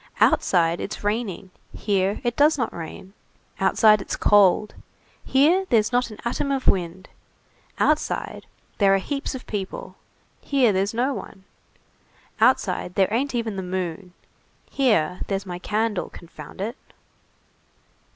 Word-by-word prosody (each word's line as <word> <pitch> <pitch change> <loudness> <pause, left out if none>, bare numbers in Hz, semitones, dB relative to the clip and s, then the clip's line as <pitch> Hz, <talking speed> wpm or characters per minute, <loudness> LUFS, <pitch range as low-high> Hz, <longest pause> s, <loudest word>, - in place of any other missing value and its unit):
Outside 170 -2 +3
it's 205 - -6
raining, 205 -3 -3 0.3
here 200 -1 0
it 240 -1 -1
does 295 +1 +4
not 235 -4 -2
rain; 170 +3 -9 0.5
outside 210 +2 +4
it's - - -4
cold, 205 0 +4 0.5
here 335 +8 +3
there's 220 -2 +3
not 245 0 +1
an 215 - -10
atom 250 +4 -1
of 270 -1 -2
wind; 180 0 0 0.7
outside 305 0 -1 0.3
there 195 -2 +5
are - - +3
heaps 275 +8 -4
of 255 - -8
people, 195 -3 -6 0.5
here 260 -6 +2
there's 195 +3 -1
no 255 +4 +1
one; 195 - -9 1.0
outside 180 - +2
there 195 +1 +2
ain't 260 +3 0
even 225 -4 -2
the - - -2
moon, 180 0 -5 0.6
here 200 - +1
there's 195 0 -2
my 175 -1 -6
candle, 215 +1 -1
confound 170 +2 -11
it!" 230 +6 -4
205 Hz, 130 wpm, -23 LUFS, 190-245 Hz, 1.0 s, there